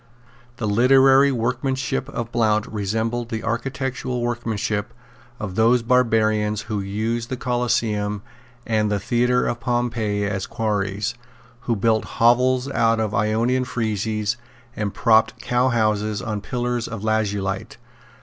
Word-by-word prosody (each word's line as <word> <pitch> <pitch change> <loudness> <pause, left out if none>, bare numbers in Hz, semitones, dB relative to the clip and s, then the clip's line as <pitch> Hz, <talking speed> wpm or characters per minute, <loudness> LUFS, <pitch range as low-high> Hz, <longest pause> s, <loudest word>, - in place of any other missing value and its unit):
The 110 - -2
literary 135 +5 +5
workmanship 130 +2 -1
of 120 -4 -5
Blount 110 -2 +2
resembled 110 +3 -2
the 110 -2 -4
architectural 125 +1 -2
workmanship 110 -3 -2 0.4
of 105 -4 -4
those 115 +4 +3
barbarians 110 -4 +2
who 110 -2 -3
used 110 +4 -2
the 130 - -3
Coliseum 110 -5 -1 0.4
and 110 -2 +1
the 105 - +1
Theatre 125 +4 +1
of 120 - -2
Pompey 115 -4 -1
as 100 -1 -2
quarries, 105 -2 -1 0.6
who 115 - +3
built 110 +1 +1
hovels 125 +2 +3
out 115 -2 +2
of 110 -2 -1
Ionian 115 +5 +1
friezes 110 -2 -2 0.4
and 105 -2 -2
propped 110 0 +3
cowhouses 110 -4 +1
on 105 -4 -4
pillars 120 +1 -2
of 115 -3 -6
lazulite. 100 -3 -1
115 Hz, 120 wpm, -22 LUFS, 105-120 Hz, 0.6 s, literary